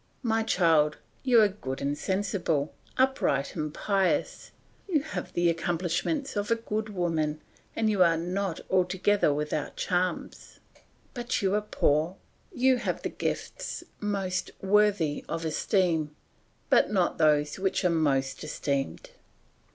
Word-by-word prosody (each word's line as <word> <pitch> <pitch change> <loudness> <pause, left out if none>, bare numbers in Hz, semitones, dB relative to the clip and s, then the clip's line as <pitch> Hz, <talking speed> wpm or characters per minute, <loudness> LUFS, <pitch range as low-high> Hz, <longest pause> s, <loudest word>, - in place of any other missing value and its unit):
My 225 -2 +1
child, 165 -8 +3 0.2
you 250 -3 +5
are - - +6
good 135 -10 -6
and 140 +1 -1
sensible, 185 -5 -1 0.2
upright 260 - +1
and 155 -2 -2
pious, 195 +3 0 0.4
you 310 -6 +2
have 310 - -5
the 175 0 +2
accomplishments 175 - -1
of 205 0 -1
a 230 - +4
good 220 -1 -3
woman 165 -5 -1 0.4
and 220 - +1
you 205 -3 +2
are 165 -2 +5
not 180 +1 -2
altogether 185 0 +2
without 150 0 -2
charms; 180 0 -2 0.5
but 240 -3 -2
you 190 0 +2
are 210 - +2
poor; 160 -4 +1 0.4
you 260 -5 +3
have 240 - -3
the - - -1
gifts - - -4 0.2
most 195 -3 -2
worthy 195 -6 +2
of 165 0 -3
esteem, 160 -2 +1 0.6
but - - +5
not 185 -4 +1
those 150 0 +3
which 190 0 0
are 180 - +4
most 135 -4 0
esteemed. 140 - -3
180 Hz, 135 wpm, -28 LUFS, 155-210 Hz, 0.6 s, are